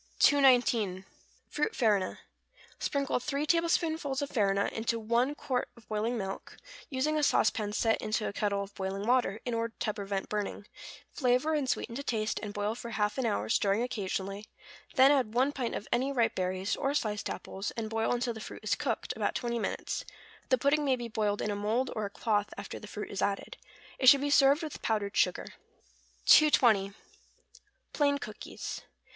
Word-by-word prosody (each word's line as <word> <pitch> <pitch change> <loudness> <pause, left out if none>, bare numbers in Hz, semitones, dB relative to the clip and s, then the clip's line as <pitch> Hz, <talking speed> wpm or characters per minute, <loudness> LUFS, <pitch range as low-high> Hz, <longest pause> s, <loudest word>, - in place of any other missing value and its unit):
219. 240 -9 +4 0.4
=Fruit 300 - -2
Farina.= 205 -6 +1 0.6
Sprinkle 280 -3 0
three 280 +3 -2
tablespoonfuls 320 -3 +1
of 285 - -5
farina 200 -3 +2
into 230 +1 -1
one 235 +6 +1
quart 260 -4 -2
of 230 - -18
boiling 220 +3 -1
milk, 195 -2 -6 0.3
using 300 +3 0
a - - +1
sauce 280 - +4
pan 210 -2 -3
set 225 +1 +1
into 215 0 -1
a - - -4
kettle 200 -1 0
of 200 0 -11
boiling 195 +1 -4
water, 240 -4 +2
in 245 - -2
order 230 0 -2
to 215 - -1
prevent 200 -2 -3
burning; 205 -1 -3 0.5
flavor 255 +3 +1
and 290 -4 0
sweeten 230 - -1
to 265 - -4
taste, 220 -5 -1
and 210 -1 -5
boil 205 +1 -1
for 235 0 -7
half 210 +2 -1
an 250 - +1
hour, 100 +1 -1
stirring 200 - +2
occasionally; 200 -3 -4 0.5
then 265 0 +7
add 255 -6 +1
one 260 +3 +3
pint 255 -5 -3
of 205 - -5
any 260 +3 +1
ripe 235 -4 +2
berries, 185 +1 -1
or 280 0 -1
sliced 210 -6 -1
apples, 195 +2 -5
and 225 -1 -2
boil 225 0 0
until 245 0 0
the 220 - -9
fruit - - -9
is 215 - +1
cooked, 270 -7 -2
about 215 -2 -1
twenty 235 -1 -1
minutes: - - -3 0.5
the 255 - +4
pudding 285 +4 +2
may 270 -2 +3
be 240 -2 -6
boiled 210 -2 -1
in 210 - -1
a - - -2
mould 220 +6 0
or 215 -2 -2
a - - -4
cloth 205 0 0
after - - -7
the 210 - -10
fruit 210 0 -6
is 195 - -3
added. 200 -1 -1 0.4
It 260 - +8
should 280 0 +7
be 285 0 0
served 280 +3 +5
with 310 - -6
powdered 210 -2 -1
sugar. - - +2 0.8
220. 225 -10 +6 1.0
=Plain 285 -1 +2
Cookies. - - -7
230 Hz, 185 wpm, -30 LUFS, 205-270 Hz, 1.0 s, It